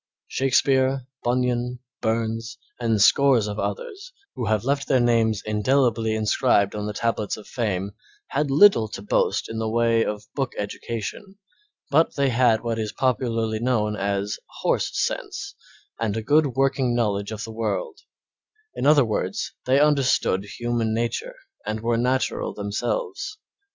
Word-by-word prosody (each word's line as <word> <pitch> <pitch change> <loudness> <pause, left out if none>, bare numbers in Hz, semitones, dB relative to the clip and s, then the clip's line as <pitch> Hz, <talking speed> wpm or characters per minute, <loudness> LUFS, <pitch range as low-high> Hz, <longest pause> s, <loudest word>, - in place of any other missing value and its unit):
Shakespeare, 130 0 +2 0.2
Bunyan, 125 0 0 0.2
Burns, 115 0 -2 0.2
and 115 -3 +1
scores 130 +1 +5
of 105 0 -4
others, 485 -1 -5 0.2
who 120 - -4
have 110 -1 +1
left 140 +2 0
their 130 - +3
names 115 -3 +2
indelibly 110 +1 +1
inscribed 105 -2 +2
on 105 0 -4
the 105 - -3
tablets 110 -1 -1
of 110 - -11
fame, 100 -5 -2 0.4
had 150 -1 0
little 140 - +6
to 100 -2 -8
boast 105 - +1
of - - -7
in 110 - -3
the 110 -1 -1
way 115 0 +2
of 105 -1 -4
book 135 -3 -2
education, 115 - -5 0.5
but 160 +3 +3
they 140 -1 +2
had 120 -2 +3
what 115 -1 -2
is 110 -1 -2
popularly 115 -4 0
known 110 -3 0
as 100 0 -2 0.2
"horse" - - +1
sense - - -3 0.5
and 110 -2 -1
a 110 - -3
good 150 +5 +4
working 135 -2 +1
knowledge 100 -3 0
of 110 0 -5
the 115 - -6
world; 370 - -3 0.7
in - - -1
other 145 -3 +6
words, 100 -3 -2
they 130 +2 +4
understood 140 -9 +2
human 120 -2 -1
nature, 280 - -2 0.3
and 110 0 -3
were 115 +1 +1
natural 125 +3 0
themselves. 385 - -3
115 Hz, 150 wpm, -24 LUFS, 110-130 Hz, 0.7 s, little